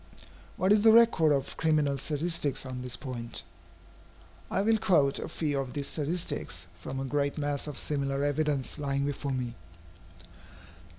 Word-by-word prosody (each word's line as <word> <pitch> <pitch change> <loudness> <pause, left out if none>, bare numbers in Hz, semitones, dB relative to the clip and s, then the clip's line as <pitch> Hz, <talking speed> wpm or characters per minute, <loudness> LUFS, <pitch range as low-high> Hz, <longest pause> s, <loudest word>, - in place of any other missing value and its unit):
What 185 +2 +2
is 210 - +4
the 220 +1 +7
record 225 -9 +6
of 135 -2 0
criminal 150 -3 +2
statistics 150 0 0
on 130 -1 -5
this 125 -1 -3
point? 120 -2 -6 1.1
I 195 - +1
will 220 +1 +3
quote 145 -8 +3
a - - -5
few 145 -3 -1
of 130 -2 -4
these 140 -1 -3
statistics, 165 - -3
from 135 +8 -5
a 135 - -2
great 140 +2 0
mass 145 -1 -1
of 150 - -6
similar 140 -1 -1
evidence 145 -1 0
lying 140 -1 0
before 140 0 -3
me. 125 -2 -2
145 Hz, 155 wpm, -29 LUFS, 135-155 Hz, 1.1 s, the